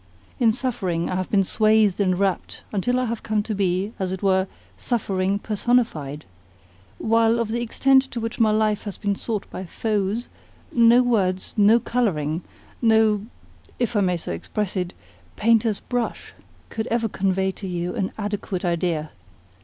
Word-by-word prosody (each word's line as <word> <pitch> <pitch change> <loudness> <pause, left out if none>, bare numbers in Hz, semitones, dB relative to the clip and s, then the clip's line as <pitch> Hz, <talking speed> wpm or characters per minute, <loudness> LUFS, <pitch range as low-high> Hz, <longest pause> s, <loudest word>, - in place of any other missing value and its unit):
In 230 -3 +5
suffering 215 -10 -2
I - - -1
have 185 0 -2
been 195 -2 +3
swathed 215 0 +3
and 185 -3 +2
wrapped 195 -1 -1
until 245 +5 +1
I 255 - 0
have 230 -1 -3
come 215 -2 0
to 215 - -3
be, 195 +1 0
as 185 -1 -1
it 190 +1 -5
were, 190 -1 +3 0.3
suffering 195 -4 -1
personified; 205 - 0 0.7
while 225 +1 +3
of 230 -2 -1
the 235 +2 -1
extent 265 +3 +4
to 240 - -4
which 230 +2 -4
my 225 -2 +5
life 215 -1 +2
has 205 - -5
been 205 -1 0
sought 210 +1 -3
by 185 - -5
foes, 210 +4 -1 0.4
no 235 +1 +6
words, 190 -6 0
no 215 +2 +5
colouring, 170 -11 -1 0.4
no 220 -2 +3 0.5
(if 240 -1 -1
I 205 - +3
may 180 -2 +1
so 160 - -6
express 190 - -3
it?) 180 -1 -2 0.4
painter's 225 -1 +2
brush 245 -2 -3 0.4
could 220 -1 -3
ever 230 0 0
convey 190 -1 0
to 190 +1 -8
you 175 0 -3
an 190 - -2
adequate 205 -3 -3
idea. 170 -3 -1
210 Hz, 160 wpm, -23 LUFS, 185-230 Hz, 0.7 s, no